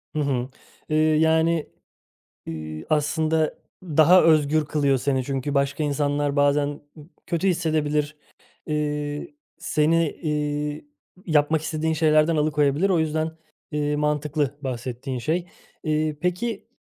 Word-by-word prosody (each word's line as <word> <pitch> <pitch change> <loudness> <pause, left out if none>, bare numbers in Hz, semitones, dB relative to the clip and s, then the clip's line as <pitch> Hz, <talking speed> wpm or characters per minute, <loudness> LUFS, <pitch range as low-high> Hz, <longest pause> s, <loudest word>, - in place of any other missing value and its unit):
Hı - - 0
hı. 135 -4 -1 0.4
Eee, 155 - +1
yani, 160 +1 +2 0.8
eee, 80 -1 -6
aslında 155 +1 +1 0.3
daha 165 +2 +5
özgür 155 -1 +3
kılıyor 140 -2 +1
seni. 130 0 0
Çünkü 135 +2 -3
başka 140 +2 0
insanlar 145 0 0
bazen 145 0 +1
b 155 - -12 0.3
kötü 170 +2 0
hissedebilir. 155 -4 0 0.5
Eee, 150 -1 -2 0.3
seni, 165 -1 +2
eee, 150 - -3 0.4
yapmak 155 -1 +2
istediğin 160 0 -1
şeylerden 155 +1 +3
alıkoyabilir. 150 +3 +2
O 180 -4 +3
yüzden, 160 0 -1 0.4
eee, 150 0 0
mantıklı 150 -1 0
bahsettiğin 130 0 -4
şey. 165 +7 -1 0.4
Eee, 155 -1 0
peki 195 +5 -2
150 Hz, 115 wpm, -24 LUFS, 145-160 Hz, 0.8 s, daha